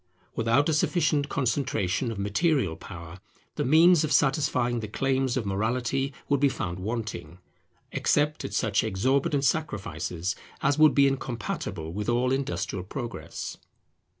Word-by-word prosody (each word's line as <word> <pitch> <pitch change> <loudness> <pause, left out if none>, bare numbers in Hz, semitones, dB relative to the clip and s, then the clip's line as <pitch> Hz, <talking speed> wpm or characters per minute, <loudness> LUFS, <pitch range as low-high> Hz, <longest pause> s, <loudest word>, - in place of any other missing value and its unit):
Without 115 +6 +2
a 160 - +2
sufficient 150 -2 +1
concentration 120 -4 0
of 110 - -6
material 105 - +1
power, 85 +2 -10 0.3
the - - -2
means 160 +4 +6
of 155 - -1
satisfying 130 -4 +2
the 110 - -5
claims 130 +3 0
of 120 - -1
morality 120 +7 -1 0.2
would 140 -1 +2
be 140 0 +4
found 90 -8 -4
wanting, 95 -6 -4 0.5
except 150 +1 +1
at 100 - -5
such 105 0 +1
exorbitant 130 +7 +1
sacrifices 95 - -2 0.3
as 145 +1 +2
would 155 -2 +6
be 140 - +6
incompatible 110 -10 -3
with 105 +4 -3
all 125 +2 +2
industrial 100 -8 -2
progress. 115 0 -6
120 Hz, 135 wpm, -27 LUFS, 100-140 Hz, 0.5 s, means